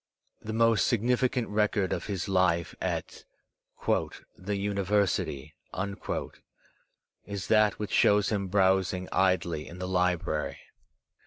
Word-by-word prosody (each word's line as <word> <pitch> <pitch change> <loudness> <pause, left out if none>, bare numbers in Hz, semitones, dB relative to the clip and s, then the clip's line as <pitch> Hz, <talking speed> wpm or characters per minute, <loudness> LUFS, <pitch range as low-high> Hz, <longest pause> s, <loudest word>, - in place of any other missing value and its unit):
The 110 - -6
most 115 -1 +3
significant 125 +1 +1
record 105 -2 +1
of - - -4
his 95 -4 -3
life 90 -3 +1
at - - -3 0.6
"the 100 +2 -2
University" 100 -7 -1 1.7
is 100 -2 -6
that 110 -2 +4
which 105 -2 -5
shows 100 -1 +4
him 100 -3 -1
browsing 95 -1 +2
idly 85 -4 +1
in 85 - -10
the 90 0 -4
library. 90 -4 0
100 Hz, 105 wpm, -28 LUFS, 90-105 Hz, 1.7 s, that